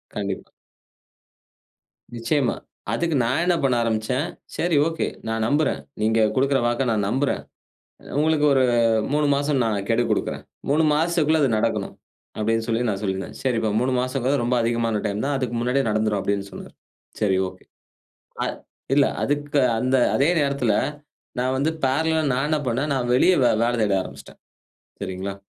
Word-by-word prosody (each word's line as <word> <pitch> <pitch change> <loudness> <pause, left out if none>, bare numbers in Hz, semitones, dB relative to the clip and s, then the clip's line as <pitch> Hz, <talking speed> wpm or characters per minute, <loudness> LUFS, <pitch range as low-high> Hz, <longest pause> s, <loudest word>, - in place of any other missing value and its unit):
கண்டிப்பா. 100 -2 -4 1.6
நிச்சயமா. 120 +3 0 0.4
அதுக்கு 165 -3 0
நான் 130 +8 +1
என்ன 180 -1 +3
பண்ண 130 -3 +3
ஆரம்பிச்சேன், 115 +6 -1 0.3
சரி. 170 -2 +1
ஓகே. 165 -1 -2 0.2
நான் 110 0 -1
நம்புறேன். 150 +3 +1 0.2
நீங்க 110 +1 +2 0.2
கொடுக்கிற 135 +1 +2
வாக்க 120 +2 0
நான் 105 -3 0
நம்புறேன். 135 +4 0 0.8
உங்களுக்கு 155 -1 +2
ஒரு 130 -1 +4 0.5
3 150 0 +2
மாசம் 140 -2 0
நான் 100 -3 -1
கெடு 115 +1 +2
கொடுக்கிறேன். - - -1 0.3
3 155 +3 +3
மாசத்துக்குள்ள 160 -1 +2
அது 135 - +3
நடக்கணும். 105 -3 -1 0.4
அப்பிடின்னு 115 +1 0
சொல்லி 115 +1 +1
நான் 100 -1 -1
சொல்லியிருந்தேன். 95 -1 -3
சரிப்பா! 115 -5 0
3 130 +1 0
மாசம்ங்கிறது 130 +1 0
ரொம்ப 125 +1 +1
அதிகமான 115 -2 0
டைம் 105 +4 -2
தான். 145 0 0
அதுக்கு 125 -3 -2
முன்னாடியே 125 +3 +1
நடந்துரும் 110 -1 +1
அப்பிடின்னு 100 0 -2
சொன்னாரு. - - -10 0.5
சரி 100 -3 +2
ஓகே. - - -14 0.8
அ - - -1 0.5
இல்ல 140 -1 +5 0.2
அதுக்கு 145 0 0 0.2
அந்த 130 +2 +1 0.2
அதே 140 +4 +3
நேரத்தில 140 -6 +1 0.7
நான் 130 +1 0
வந்து 150 +4 +1
ஃபேரலலா 160 +4 +1
நான் 135 +3 0
என்ன 155 - +1
பண்ணேன், 135 +5 -1
நான் 125 -2 -1
வெளிய 160 +8 +5
வே - - +5
வேல 120 - +1
தேட 100 -2 +2
ஆரம்பிச்சிட்டேன். - - -12 0.6
சரிங்களா! 95 0 -4
125 Hz, 150 wpm, -23 LUFS, 110-145 Hz, 1.6 s, இல்ல